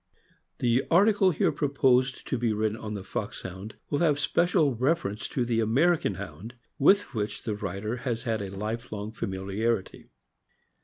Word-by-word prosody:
>HE 120 +1 +3
article 200 +2 +5
here 170 - +2
proposed 135 -2 +1
to - - -1
be 120 -2 0
written 110 0 0
on 110 -1 -6
the 100 - -5
Fox 105 +1 -5
hound 95 +3 -8 0.2
will 145 - +1
have 150 -4 +3
special 160 -2 +2
reference 120 -4 0
to 125 - -1
the 115 -1 0
American 130 - +2
Hound, 100 +4 -8 0.2
with 195 +2 +4
which 105 -3 -3
the 110 - -2
writer 105 +3 -4
has 120 -1 -3
had 115 -4 -1
a 100 - -4
life 110 +5 -5
long 105 0 -5
familiarity. 100 +1 -2
115 Hz, 160 wpm, -27 LUFS, 105-135 Hz, 0.2 s, article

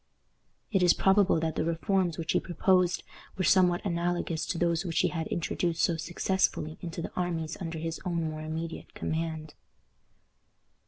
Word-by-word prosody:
It 195 -3 +2
is 175 -1 +6
probable 195 -3 +4
that 160 -1 -1
the - - 0
reforms 170 +1 0
which 165 -1 -2
he - - +3
proposed 180 +1 +2 0.3
were 190 - 0
somewhat 180 0 +4
analogous 170 -2 -1
to 175 - -2
those 170 0 +1
which 165 -3 -3
he - - +2
had 160 -2 -3
introduced 170 0 -1
so 170 - +3
successfully 165 -2 -1
into 170 -1 -5
the - - -5
armies 165 -3 -2
under 165 -2 -4
his 165 0 -4
own 170 -3 -1
more 155 0 -6
immediate 160 +1 -5
command. 160 -1 -3
170 Hz, 160 wpm, -29 LUFS, 160-180 Hz, 0.3 s, is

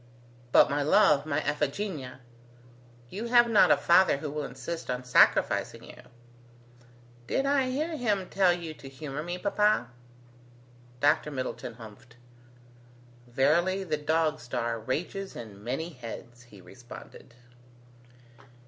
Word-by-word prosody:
But, - - +7
my 145 0 -1
love, 150 -2 +4
my 155 0 0
Iphigenia, 145 -2 -3 0.9
you 215 +4 -5
have 240 0 +5
not 220 -3 +5
a - - +5
father 170 -3 +4
who 145 0 -5
will 150 -1 -4
insist 135 +7 -7
on 125 0 -2
sacrificing 125 - +3
you." - - -13 1.3
"Did 270 - 0
I 275 -2 +2
hear 310 +6 -2
him 210 -8 -1
tell 190 -2 +3
you 170 -2 -4
to 140 -3 -12
humour 140 +1 -6
me, 175 +3 -4
papa?" 205 - +1 1.1
Dr 145 +1 +3
Middleton 130 -4 -5
humphed. 115 +2 -14 1.1
"Verily 170 +10 +1
the 160 -5 -1
dog 155 +1 0
star 120 -1 -3
rages 175 - -4
in 105 -4 -10
many 135 +8 -3
heads," 120 -3 -10
he 105 -5 -16
responded. 120 +4 -13
150 Hz, 125 wpm, -28 LUFS, 125-185 Hz, 1.3 s, But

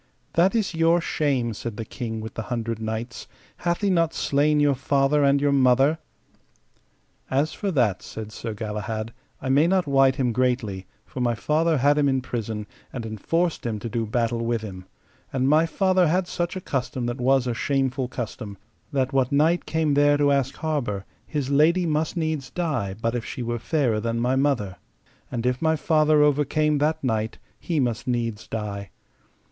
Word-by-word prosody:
That 185 +5 +3
is 215 -5 0
your 165 +1 +3
shame, 135 -8 0
said 110 0 -6
the 115 - -4
King 110 -2 -5
with 110 +1 -7
the - - -4
Hundred 115 -2 -2
Knights; 110 +2 -5 0.3
hath 175 +1 -1
he 200 -2 +2
not 165 -3 +2
slain 150 +2 +2
your 145 -1 +4
father 140 +2 +2
and 140 0 +4
your 145 0 +2
mother? 135 +3 +4 1.3
As 140 +4 +1
for 200 - -3
that, 120 - +1
said 110 -1 -8
Sir 115 0 -5
Galahad, 110 +1 -4 0.3
I 130 - -2
may 145 +5 +4
not 185 0 +2
wite 135 -2 +4
him 130 -3 +1
greatly, 115 -6 -1 0.2
for - - -8
my 120 -1 +1
father 155 +5 +1
had 145 +3 +3
him 140 -1 +3
in 130 -1 +1
prison, 110 -4 -4 0.3
and 120 -3 -5
enforced 165 - -1
him 115 -3 -2
to 115 +3 -5
do 115 -1 -2
battle 115 +1 0
with 115 -1 0
him; 95 -4 -8 0.5
and 130 0 0
my 155 +3 +4
father 185 0 +2
had 180 +3 +1
such 175 +1 -2
a 185 - -4
custom 130 -5 -2
that 120 +2 -3
was 130 0 +3
a 120 - -1
shameful 135 +1 0
custom, 110 -4 -6 0.3
that 135 -2 0
what 130 -2 +2
knight 160 +5 +2
came 160 -2 +1
there 145 0 +4
to 145 -1 +3
ask 135 -1 +1
harbour 130 -11 -2 0.2
his 145 -3 -2
lady 165 +5 +4
must 155 +1 -1
needs 155 -5 -2
die 135 - -2
but 115 +1 -1
if 120 -2 -2
she 125 - -5
were 120 0 -2
fairer 125 -5 +1
than 115 +1 -2
my 125 +2 +1
mother; 130 -9 0 0.5
and 120 -1 -3
if 125 0 0
my 160 0 +3
father 155 0 +3
overcame 150 +1 +2
that 150 +1 0
knight 110 -3 -1 0.2
he 165 -3 -1
must 120 -3 -1
needs 115 -3 -2
die. 100 -3 -4
135 Hz, 185 wpm, -24 LUFS, 115-150 Hz, 1.3 s, your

